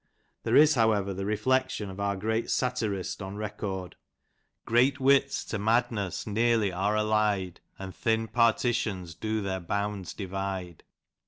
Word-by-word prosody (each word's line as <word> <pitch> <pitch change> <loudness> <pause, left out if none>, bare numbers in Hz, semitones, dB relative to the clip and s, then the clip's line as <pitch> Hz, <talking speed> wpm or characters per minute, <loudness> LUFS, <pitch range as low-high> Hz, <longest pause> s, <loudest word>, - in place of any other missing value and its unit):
There - - 0
is, 155 +1 +7
however, 110 -6 +2
the 95 +1 -4
reflection 130 -1 0
of 95 - -10
our 100 0 0
great 110 +4 -1
satirist 110 -8 -1
on 95 +1 -6
record: 100 -3 -5 0.7
G - - -7
reat 130 +4 +4
wits 140 +1 +3
to 115 - -4
madness 110 -3 0
nearly 110 -1 +2
are 100 +4 0
aUied, 105 -4 +1 0.2
And 95 -1 -7
thin 110 0 0
partitions 110 -5 +1
do 110 +6 -2
their 95 -1 -2
bounds 100 +1 -3
divide. 95 -3 -5
105 Hz, 140 wpm, -28 LUFS, 95-115 Hz, 0.7 s, is